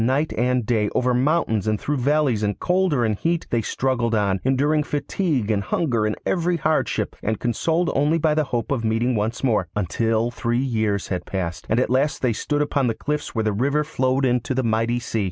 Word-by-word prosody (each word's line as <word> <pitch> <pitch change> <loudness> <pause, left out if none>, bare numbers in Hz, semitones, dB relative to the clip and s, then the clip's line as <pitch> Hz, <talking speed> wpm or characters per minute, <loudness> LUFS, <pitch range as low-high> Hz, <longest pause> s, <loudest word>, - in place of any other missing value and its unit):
Night 135 +6 +1
and 125 0 +1
day, 105 -2 +1
over 125 0 +2
mountains 125 - +1
and 110 -1 +1
through 145 0 -2
valleys, 135 -3 +1
in 105 -1 0
cold 180 - +1
or 125 -5 +2
in 110 - +1
heat, 165 +10 -1
they 115 - +2
struggled 120 -1 0
on, 100 -3 +1
enduring 145 +4 +2
fatigue 145 - -1
and 100 -2 +1
hunger 115 - 0
and 105 - -1
every 175 -1 +1
hardship, 155 0 0
and 110 -1 -2
consoled 160 +9 0
only 150 +4 +2
by 160 -1 +2
the 155 0 +1
hope 120 +1 -3
of 130 -4 0
meeting 115 +3 +1
once 110 +3 -2
more 110 -8 +1
until 110 +4 0
three 120 0 -1
years 110 -6 -1
had 90 -2 -2
passed, 90 -3 -4
and 110 - +2
at 125 - 0
last 135 +3 +1
they 125 -3 +2
stood 145 +6 -1
upon 140 -3 0
the 115 - 0
cliffs 150 +1 -3
where 110 - +1
the 110 -1 0
river 140 +8 +1
flowed 130 -2 0
into 125 +1 0
the 130 - 0
mighty 115 +1 +1
sea. 120 -2 -3
125 Hz, 210 wpm, -22 LUFS, 110-145 Hz, -, over